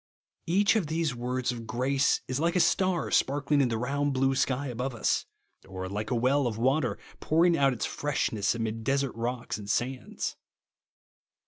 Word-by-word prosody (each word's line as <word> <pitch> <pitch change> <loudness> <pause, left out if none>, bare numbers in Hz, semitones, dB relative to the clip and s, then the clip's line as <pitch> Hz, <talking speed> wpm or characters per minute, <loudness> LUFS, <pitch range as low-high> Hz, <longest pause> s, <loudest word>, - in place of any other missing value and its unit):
Each 195 +6 +3
of 205 -8 +1
these 160 -2 0
words 125 +1 -2
of 115 -2 -7
grace 130 +4 +1
is 130 +1 -2
like 170 +3 +1
a - - +4
star 185 -1 +2
sparkling 145 +1 +2
in 135 - +3
the 115 - -1
round, 140 +4 -1
blue 135 +1 +2
sky 135 +1 0
above 125 0 -3
us; 115 - 0 0.4
or 95 -1 -5
like 105 +3 -4
a - - 0
well 130 +3 +2
of 110 -2 -3
water 130 +6 +1 0.2
pouring 170 +2 +3
out 140 -3 +3
its 125 - -2
freshness 115 -7 -1
amid 115 -1 -3
desert 135 +1 0
rocks 120 -1 -3
and 100 -1 -8
sands. 125 +5 -2
130 Hz, 175 wpm, -28 LUFS, 120-145 Hz, 0.4 s, a